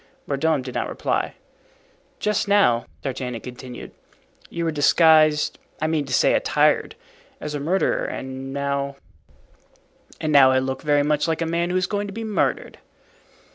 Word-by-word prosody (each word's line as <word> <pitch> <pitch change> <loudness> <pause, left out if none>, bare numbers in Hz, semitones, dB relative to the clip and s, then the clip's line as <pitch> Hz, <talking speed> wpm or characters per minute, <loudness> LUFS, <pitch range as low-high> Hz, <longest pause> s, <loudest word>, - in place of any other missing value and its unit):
Mordaunt 145 -1 0
did 125 - -6
not - - -2
reply. - - -2 0.8
"Just 210 -1 0
now," 195 - +3 0.2
D'Artagnan 125 -3 -4
continued, 125 0 -9 0.6
"you 170 0 -3
were 165 - 0
disguised—I 155 0 +3
mean 155 -2 0
to 135 - -9
say, - - +4
attired—as 150 0 -1
a 145 - -3
murderer, 175 +7 0
and 130 0 -6
now——" 140 0 -2 1.2
"And 155 -1 -1
now 135 -2 +7
I 130 - +3
look 130 0 -2
very 145 -1 +2
much 150 +1 +1
like 165 0 0
a - - -2
man 170 +1 -1
who 180 - 0
is 185 - +1
going 205 +1 -2
to 200 - -8
be 225 +2 -5
murdered." 215 -2 -1
150 Hz, 150 wpm, -23 LUFS, 135-165 Hz, 1.2 s, now